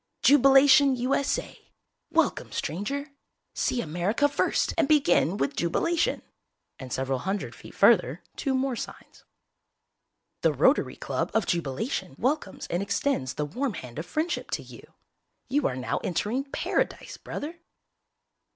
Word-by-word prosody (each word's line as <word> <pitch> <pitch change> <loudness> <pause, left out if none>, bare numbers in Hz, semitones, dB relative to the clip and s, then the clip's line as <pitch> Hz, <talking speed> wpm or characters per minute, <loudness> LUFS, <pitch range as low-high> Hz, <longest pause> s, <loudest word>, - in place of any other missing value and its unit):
JUBILATION, 275 0 +6
U.S.A.!! 260 +3 -1 0.5
WELCOME, - - +1
STRANGER! 280 - -3 0.4
See 245 - 0
America 180 - +1
first 285 - 0
and - - +2
begin 280 - +3
with 140 - -1
JUBILATION! 335 - 0 0.6
And 130 -2 -8
several 130 0 -1
hundred 195 +7 -3
feet - - -13
further - - +4
two 270 -3 -1
more 260 -1 0
signs. - - -9 1.2
THE - - +3
ROTARY - - +3
CLUB - - -2
of 225 - +2
Jubilation 170 - -2
welcomes 260 -5 -1
and 175 - 0
extends 200 - -1
the 150 - -1
warm 245 - -3
hand 125 -1 -8
of 165 - -6
friendship 315 - -2
to - - -3
you!!!! - - -12 0.7
You 280 +2 +2
are 125 - -3
now 130 - -2
entering 215 - -1
Paradise, 275 - -2
brother! 325 +4 -6
245 Hz, 130 wpm, -27 LUFS, 170-280 Hz, 1.2 s, JUBILATION